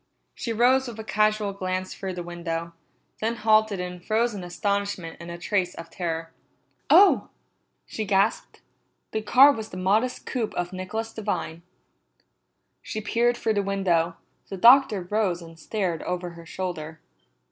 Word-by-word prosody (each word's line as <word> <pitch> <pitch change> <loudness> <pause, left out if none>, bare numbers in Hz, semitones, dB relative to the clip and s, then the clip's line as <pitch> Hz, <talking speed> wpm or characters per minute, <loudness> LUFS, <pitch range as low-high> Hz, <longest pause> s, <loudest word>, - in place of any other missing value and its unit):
She 235 - -4
rose 255 +4 +3
with 230 -2 -8
a - - -5
casual 215 -1 +1
glance 185 -1 -3
through 190 -1 -5
the 175 -1 -5
window, 170 -1 -5 0.5
then 225 +2 -1
halted 215 -2 +3
in 180 0 -5
frozen 215 +1 0
astonishment 200 -1 -2
and 170 0 -9
a 170 - -6
trace 180 0 -1
of 165 0 -9
terror. 165 -2 -4 0.6
"Oh!" 400 - +6 0.6
she 220 - -4
gasped. 200 +1 0 0.5
The 220 - -1
car 260 +6 +7
was 220 -5 -5
the 185 - -8
modest 210 +7 +1
coupe 235 -5 -3
of 175 +1 -3
Nicholas 220 +5 -4
Devine. 200 -6 -3 1.2
She 215 - -5
peered 235 +3 +1
through 220 - 0
the 205 - +1
window; 180 -4 +1 0.3
the 195 - -5
Doctor 235 -2 +6
rose 190 -2 0
and 165 -1 -13
stared 180 -2 -2
over 180 -1 -3
her 170 -1 -13
shoulder. 165 -3 -5
195 Hz, 150 wpm, -25 LUFS, 175-220 Hz, 1.2 s, car